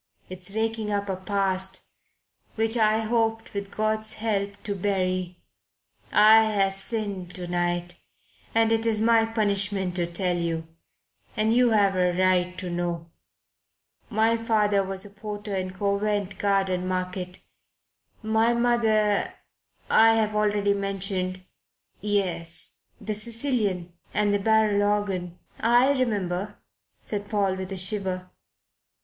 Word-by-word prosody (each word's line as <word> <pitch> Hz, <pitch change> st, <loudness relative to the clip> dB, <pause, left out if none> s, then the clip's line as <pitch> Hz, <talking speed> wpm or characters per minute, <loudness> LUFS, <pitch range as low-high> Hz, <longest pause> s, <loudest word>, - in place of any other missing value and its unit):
"It's 185 Hz, +2 st, -7 dB
raking 220 Hz, -1 st, -1 dB
up 200 Hz, 0 st, -1 dB
a 190 Hz, -, 0 dB
past 190 Hz, 0 st, -1 dB, 0.7 s
which 225 Hz, +1 st, +1 dB
I 220 Hz, -1 st, +3 dB
had 220 Hz, -, -4 dB
hoped, 225 Hz, -1 st, 0 dB
with 200 Hz, -1 st, -4 dB
God's 215 Hz, +1 st, -1 dB
help, 205 Hz, -2 st, -1 dB
to 205 Hz, -, -2 dB
bury. 185 Hz, -2 st, -1 dB, 0.7 s
But -, -, -4 dB
I 220 Hz, +1 st, +8 dB
have 195 Hz, -1 st, +2 dB
sinned 195 Hz, -3 st, -2 dB
to 180 Hz, -, -5 dB
night, 175 Hz, 0 st, -2 dB, 0.6 s
and 225 Hz, 0 st, +4 dB
it 225 Hz, 0 st, +1 dB
is 220 Hz, -2 st, +1 dB
my 225 Hz, 0 st, +4 dB
punishment 200 Hz, -4 st, -1 dB
to 175 Hz, -1 st, -1 dB
tell 180 Hz, 0 st, 0 dB
you. 165 Hz, -1 st, -2 dB, 0.7 s
And 215 Hz, +1 st, +2 dB
you 245 Hz, 0 st, +4 dB
have 200 Hz, -3 st, +3 dB
a 180 Hz, -1 st, +2 dB
right 180 Hz, -1 st, +2 dB
to 180 Hz, -2 st, -5 dB
know. 170 Hz, -1 st, -3 dB, 1.0 s
My 225 Hz, +1 st, +2 dB
father 210 Hz, -3 st, +2 dB
was 190 Hz, +1 st, -4 dB
a -, -, -10 dB
porter 205 Hz, 0 st, -6 dB
in 185 Hz, -1 st, -2 dB
Covent 200 Hz, 0 st, -1 dB
Garden 195 Hz, -2 st, +1 dB
Market. 185 Hz, 0 st, -3 dB, 0.9 s
My 220 Hz, +2 st, +2 dB
mother 220 Hz, -4 st, +2 dB, 0.5 s
I've 225 Hz, -1 st, +4 dB
already 205 Hz, -1 st, +2 dB
mentioned 195 Hz, -2 st, -3 dB, 0.3 s
" -, -, -42 dB, 0.2 s
"Yes 170 Hz, -4 st, -3 dB, 0.2 s
the 215 Hz, -, -3 dB
Sicilian 215 Hz, -5 st, -1 dB, 0.2 s
and 210 Hz, -1 st, +2 dB
the 205 Hz, -, +2 dB
barrel 215 Hz, -1 st, +3 dB
organ 195 Hz, -4 st, -1 dB, 0.2 s
I 240 Hz, +4 st, +4 dB
remember," 205 Hz, -7 st, -1 dB, 0.5 s
said 205 Hz, -1 st, -2 dB
Paul, 200 Hz, -3 st, +1 dB
with 190 Hz, 0 st, -6 dB
a 195 Hz, -, -3 dB
shiver. 185 Hz, -1 st, -2 dB
200 Hz, 130 wpm, -25 LUFS, 185-220 Hz, 1.0 s, I